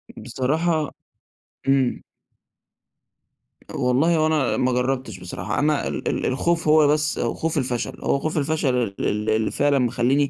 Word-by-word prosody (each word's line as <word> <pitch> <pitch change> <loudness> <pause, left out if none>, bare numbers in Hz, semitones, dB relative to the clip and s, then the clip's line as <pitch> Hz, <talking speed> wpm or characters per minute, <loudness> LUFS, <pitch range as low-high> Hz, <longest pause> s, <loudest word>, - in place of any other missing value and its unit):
بصراحة 155 +3 -1 0.8
إمم. 135 -2 +2 1.7
والله 140 +7 +2
هو 155 0 +3
أنا 155 -5 +1
ما 130 0 +1
جربتش 125 -4 -2
بصراحة، 90 0 -4
أنا 150 0 +1
ال - - -4
ال - - -1
الخوف 165 +6 0
هو 155 -1 +6
بس، 150 +1 +1
خوف 165 0 -1
الفشل، 125 -3 -2
هو 140 - +1
خوف 155 +3 -2
الفشل 145 -3 +1
ال 115 -6 -1
ال 105 +1 -1
اللي 110 0 +1
فعلًا 145 -1 +2
مخليني 130 +3 +1
135 Hz, 140 wpm, -23 LUFS, 125-155 Hz, 1.7 s, هو